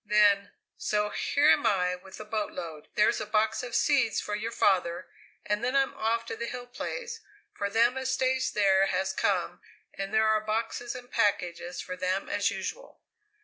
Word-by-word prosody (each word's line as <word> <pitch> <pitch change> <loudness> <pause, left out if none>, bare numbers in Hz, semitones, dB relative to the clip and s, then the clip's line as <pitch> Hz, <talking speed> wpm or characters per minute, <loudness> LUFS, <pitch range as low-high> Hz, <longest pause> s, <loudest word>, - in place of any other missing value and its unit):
Then: 205 -1 +4 0.3
"So 210 0 0
here 290 +7 +3
am - - +3
I 180 -2 +2
with 185 +1 -13
the 215 - -8
boatload 180 -8 -4
there's 210 - +3
a - - -3
box 215 0 +1
of 245 -1 -5
seeds 270 -8 +3
for 210 - -4
your 220 +2 -2
father 180 -4 +1 0.4
and 210 +2 -1
then 250 +2 0
I'm 270 -1 +2
off 230 +1 -1
to - - -5
the 235 +1 -4
Hill 245 0 -6
Place, 465 - -5 0.3
for 200 - -2
them 230 +4 +3
as 260 0 -1
stays 260 0 +1
there 195 -2 +4
has 190 0 0
come, - - 0 0.3
and 195 0 -5
there 220 0 +3
are 215 0 +3
boxes 225 +3 -2
and 250 0 -10
packages 180 -5 0
for 185 - -6
them 185 +1 -1
as - - +1
usual." - - -6
215 Hz, 185 wpm, -28 LUFS, 195-245 Hz, 0.4 s, Then